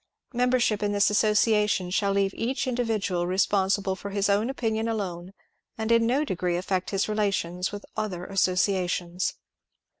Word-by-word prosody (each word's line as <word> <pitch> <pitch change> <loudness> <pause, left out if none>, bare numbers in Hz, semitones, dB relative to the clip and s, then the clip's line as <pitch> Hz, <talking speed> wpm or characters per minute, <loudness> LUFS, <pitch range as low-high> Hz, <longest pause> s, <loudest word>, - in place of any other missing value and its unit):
Member 250 +1 +2
ship 215 -3 +1
in 205 0 0
this 205 0 +3
ALSsociation 210 -3 +2
shall 200 0 +1
leave 195 0 +1
each 255 +5 -2
individual 220 -8 -1
responsible 190 +1 +1
for 200 +2 -7
his 200 0 0
own 210 +4 +1
opinion 225 -4 -1
alone, 185 -5 -4 0.5
and 220 +1 -2
in 230 0 +4
no 275 +5 +1
d^;ree 180 - -1
affect 185 0 -2
his 195 -1 0
relations 195 -4 -1
with 205 0 -7
other 185 -5 -3
associations. 180 -2 0
200 Hz, 150 wpm, -26 LUFS, 185-220 Hz, 0.5 s, in